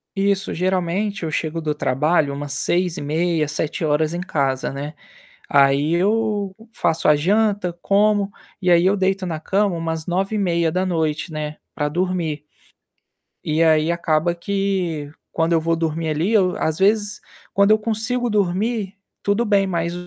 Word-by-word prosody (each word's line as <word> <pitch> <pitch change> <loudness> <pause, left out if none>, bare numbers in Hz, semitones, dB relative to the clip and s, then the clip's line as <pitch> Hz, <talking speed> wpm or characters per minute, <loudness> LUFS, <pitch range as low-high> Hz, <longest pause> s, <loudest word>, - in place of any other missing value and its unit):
Isso. 195 0 0
Geralmente 185 +2 -1
eu 160 - -2
chego 160 +1 -2
do 150 -1 -2
trabalho 150 +2 +1
umas 145 0 -5
18h30, 170 -2 0
19h 155 +1 -1
em 175 - -3
casa, 135 -8 -1
né. 145 +2 -5 0.6
Aí, 140 +3 +4
eu 205 +1 0 0.2
faço 165 -6 0
a 150 - +6
janta, 200 +3 +1
como. 205 0 +2 0.3
E 180 - +1
aí, 175 0 +5
eu 195 +2 +4
deito 190 0 0
na 165 -3 -3
cama 195 +2 +1
umas 165 -1 -3
21h30, 175 -4 0
né, 150 0 -4 0.2
pra 150 0 -1
dormir. 170 -2 -1 1.0
E 155 +2 +1
aí, 160 0 +3
acaba 170 0 +1
que, 185 -6 -2 0.2
quando 165 +1 +1
eu 165 - +3
vou 165 +1 +1
dormir 165 0 -2
ali, 160 +8 0
eu 185 -4 +3
às 160 0 -1
vezes, 205 +1 +2 0.3
quando 200 +1 +4
eu 215 - +5
consigo 225 +3 -1
dormir, 205 +1 0 0.3
tudo 205 +4 +1
bem. 200 -2 +3
Mas 170 -2 -1
175 Hz, 145 wpm, -21 LUFS, 155-200 Hz, 1.0 s, a